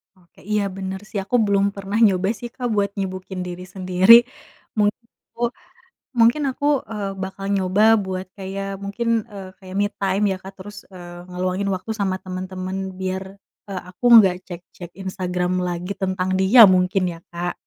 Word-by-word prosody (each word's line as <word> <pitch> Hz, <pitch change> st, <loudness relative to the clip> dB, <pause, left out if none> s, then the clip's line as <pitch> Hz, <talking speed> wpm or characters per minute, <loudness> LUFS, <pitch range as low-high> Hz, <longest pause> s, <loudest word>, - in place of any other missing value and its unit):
Oke, 180 Hz, -2 st, -25 dB
iya 210 Hz, -1 st, +2 dB
bener 190 Hz, 0 st, -4 dB
sih 205 Hz, -, -3 dB
aku 225 Hz, -, -2 dB
belum 200 Hz, -1 st, +2 dB
pernah 200 Hz, +1 st, -3 dB
nyoba 190 Hz, -1 st, +2 dB
sih 240 Hz, -, -5 dB
Kak 250 Hz, -2 st, -3 dB
buat 200 Hz, -1 st, +1 dB
nyibukin 185 Hz, -1 st, -4 dB
diri 180 Hz, +1 st, -7 dB
sendiri 185 Hz, +2 st, +5 dB, 0.6 s
menghipo 230 Hz, +2 st, -2 dB, 0.7 s
mungkin 235 Hz, +6 st, +4 dB
aku 285 Hz, -, -5 dB, 0.3 s
e -, -, -4 dB, 0.3 s
bakal 195 Hz, +1 st, -6 dB
nyoba 190 Hz, +2 st, +1 dB, 0.2 s
buat 185 Hz, 0 st, -4 dB
kayak 195 Hz, 0 st, -5 dB, 0.2 s
mungkin 205 Hz, +4 st, -4 dB, 0.3 s
e -, -, -10 dB, 0.2 s
kayak 190 Hz, -1 st, -10 dB
me 205 Hz, -, +3 dB
time 195 Hz, +1 st, 0 dB
ya -, -, -1 dB
Kak 190 Hz, +1 st, -9 dB
terus 205 Hz, +2 st, -10 dB, 0.2 s
e -, -, -10 dB, 0.3 s
ngeluangin 185 Hz, +2 st, -2 dB
waktu 185 Hz, +4 st, -6 dB
sama 190 Hz, -2 st, 0 dB
temen-temen 185 Hz, 0 st, -5 dB, 0.2 s
biar 190 Hz, 0 st, -2 dB, 0.5 s
e -, -, -6 dB, 0.2 s
aku 185 Hz, +7 st, -8 dB
nggak 190 Hz, -5 st, +6 dB
cek-cek 175 Hz, -1 st, -10 dB
Instagram 180 Hz, -2 st, -2 dB, 0.2 s
lagi 175 Hz, +2 st, -4 dB
tentang 185 Hz, -1 st, -1 dB
dia 200 Hz, +6 st, +7 dB
mungkin 185 Hz, +1 st, +2 dB
ya 165 Hz, -, -12 dB
Kak. 175 Hz, +1 st, -3 dB
190 Hz, 160 wpm, -22 LUFS, 185-200 Hz, 0.7 s, dia